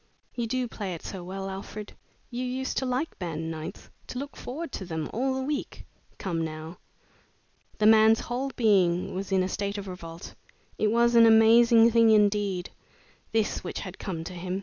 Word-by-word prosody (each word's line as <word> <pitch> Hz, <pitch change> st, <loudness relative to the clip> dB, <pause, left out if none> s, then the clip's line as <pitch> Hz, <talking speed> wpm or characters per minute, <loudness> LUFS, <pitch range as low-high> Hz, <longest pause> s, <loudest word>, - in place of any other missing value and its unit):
You 235 Hz, -2 st, -2 dB
do 255 Hz, +1 st, -1 dB
play 200 Hz, -6 st, -5 dB
it 165 Hz, -, -11 dB
so 190 Hz, -3 st, -6 dB
well, 195 Hz, +2 st, -5 dB
Alfred. 200 Hz, +2 st, -7 dB, 0.4 s
You 245 Hz, +1 st, -3 dB
used 260 Hz, +1 st, -3 dB
to 265 Hz, -, 0 dB
like 255 Hz, +6 st, -2 dB
band 165 Hz, -2 st, -4 dB
nights 155 Hz, -1 st, -8 dB, 0.2 s
to -, -, -6 dB
look 280 Hz, +2 st, -6 dB
forward 290 Hz, +4 st, -6 dB
to -, -, -5 dB
them 160 Hz, -3 st, -4 dB
all 260 Hz, +3 st, 0 dB
the 265 Hz, -, -2 dB
week. 290 Hz, +1 st, -4 dB, 0.3 s
Come, 170 Hz, -4 st, -2 dB
now!" 160 Hz, +2 st, -7 dB, 1.0 s
The 215 Hz, -, +1 dB
man's 220 Hz, 0 st, +6 dB
whole 255 Hz, +3 st, -3 dB
being 185 Hz, -6 st, +2 dB
was 195 Hz, +1 st, -5 dB
in 190 Hz, -1 st, +3 dB
a -, -, -1 dB
state 200 Hz, +1 st, -3 dB
of 200 Hz, -1 st, -6 dB
revolt. 170 Hz, -2 st, -8 dB, 0.5 s
It 215 Hz, -, +3 dB
was 235 Hz, +2 st, +3 dB
an 230 Hz, -1 st, +7 dB
amazing 230 Hz, +1 st, +6 dB
thing 230 Hz, 0 st, +5 dB
indeed, 205 Hz, -4 st, +2 dB, 0.6 s
this 220 Hz, -2 st, 0 dB
which 180 Hz, -, -5 dB
had 185 Hz, -1 st, -8 dB
come 170 Hz, -4 st, -4 dB
to 185 Hz, -, -7 dB
him. 180 Hz, +2 st, -4 dB
210 Hz, 185 wpm, -27 LUFS, 180-235 Hz, 1.0 s, an